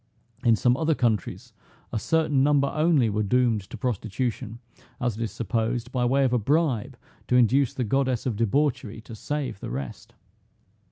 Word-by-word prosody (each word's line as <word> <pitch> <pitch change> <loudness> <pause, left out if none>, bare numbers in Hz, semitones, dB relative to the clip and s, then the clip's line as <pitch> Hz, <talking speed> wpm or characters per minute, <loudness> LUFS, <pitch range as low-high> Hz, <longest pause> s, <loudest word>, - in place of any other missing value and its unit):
In 115 -2 +5
some 125 +3 +2
other 160 0 +1
countries, 110 -8 -1 0.4
a - - 0
certain 155 0 +1
number 140 0 +3
only 155 -5 +2
were 105 0 -1
doomed 115 0 +2
to - - -7
prostitution, 115 -1 -3 0.4
as 120 -4 -1
it 115 - -7
is 115 - -2
supposed, 115 +2 -2
by 125 -1 0
way 135 +3 +3
of 130 -2 +1
a 125 - +3
bribe, 140 -1 0 0.3
to 125 - +2
induce 125 +2 +3
the 130 - -1
goddess 130 +1 0
of 125 -4 -1
debauchery 115 0 0
to 115 - -12
save 140 -1 -4
the - - -6
rest. 65 +1 -7
125 Hz, 170 wpm, -25 LUFS, 110-140 Hz, 0.4 s, In